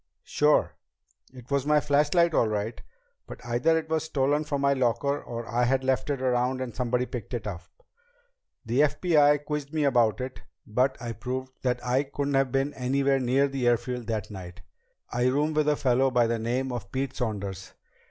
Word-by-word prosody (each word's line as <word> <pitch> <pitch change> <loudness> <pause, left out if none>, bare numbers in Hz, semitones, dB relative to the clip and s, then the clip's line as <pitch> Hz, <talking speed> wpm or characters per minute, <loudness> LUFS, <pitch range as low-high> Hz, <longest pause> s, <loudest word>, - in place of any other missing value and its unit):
"Sure. 150 0 +2 0.6
It 125 0 -14
was 140 0 0
my 150 0 +5
flashlight 150 +4 +2
all 115 - +3
right. 110 +2 -3 0.5
But - - -10
either 125 +8 +2
it 160 -1 -3
was 160 -1 -1
stolen 145 0 0
from 140 -2 -2
my 140 0 +3
locker, 130 +2 0
or 115 -1 -6
I 120 +1 +1
had 130 +2 +1
left 130 +2 0
it 135 -2 -2
around 125 0 +1
and 125 -4 -5
somebody 125 0 0
picked 120 -1 -6
it 115 -3 -5
up. 95 -5 -5 1.0
The 120 +4 0
FBI 150 0 +4
men 145 - -18
quizzed 150 -1 -4
me 155 -2 0
about 120 -6 +3
it, 130 0 -6 0.2
but 125 +5 0
I 120 -1 -5
proved 130 +3 -5
that 125 -1 -1
I 125 +2 +2
couldn't 140 0 -3
have 135 -1 +2
been 135 +2 0
anywhere 135 +1 +1
near 130 +2 +2
the 135 -3 -2
airfield 120 0 0
that 110 -2 -3
night. 90 -3 -9 0.5
I 120 +1 +1
room 145 +4 +1
with 150 0 +2
a 150 - +3
fellow 135 -1 +2
by 125 -2 +3
the 115 0 -1
name 125 +4 -1
of 120 -5 -6
Pete 135 +1 -3
Saunders. 100 -6 -4
130 Hz, 190 wpm, -27 LUFS, 120-140 Hz, 1.0 s, my